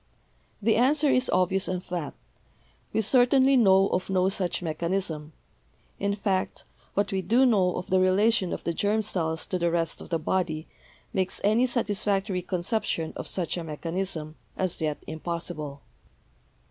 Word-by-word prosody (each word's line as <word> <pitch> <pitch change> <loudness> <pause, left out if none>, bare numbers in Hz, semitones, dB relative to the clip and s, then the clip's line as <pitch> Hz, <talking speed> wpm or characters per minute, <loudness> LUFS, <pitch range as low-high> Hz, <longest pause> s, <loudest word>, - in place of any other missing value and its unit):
The 225 +1 +3
answer 285 +4 +3
is 255 0 +2
obvious 190 +2 +1
and 180 0 -3
flat; 175 -6 -4 0.8
we - - +1
certainly 260 +4 +4
know 195 -5 +5
of 185 +1 -1
no 185 0 +2
such 185 -2 -2
mechanism; 165 -1 -2 0.7
in 200 0 0
fact, 195 -2 -2 0.3
what 205 0 +1
we 190 -1 0
do 235 +9 +3
know 195 -7 +3
of 180 - -6
the 185 - +4
relation 190 +1 +3
of - - -4
the 170 - -1
germ 210 +4 +1
cells 160 -5 -1
to 185 - -2
the 170 0 +2
rest 165 -1 0
of - - -10
the 165 - +1
body 160 -1 -1 0.5
makes 190 -1 -1
any 220 +5 +3
satisfactory 205 -5 0
conception 180 -2 -2
of - - -6
such 180 -1 -2
a 170 - -3
mechanism 165 0 -4 0.2
as 185 -3 -2
yet 150 -2 -1
impossible. 155 -3 -5
185 Hz, 155 wpm, -27 LUFS, 170-205 Hz, 0.8 s, know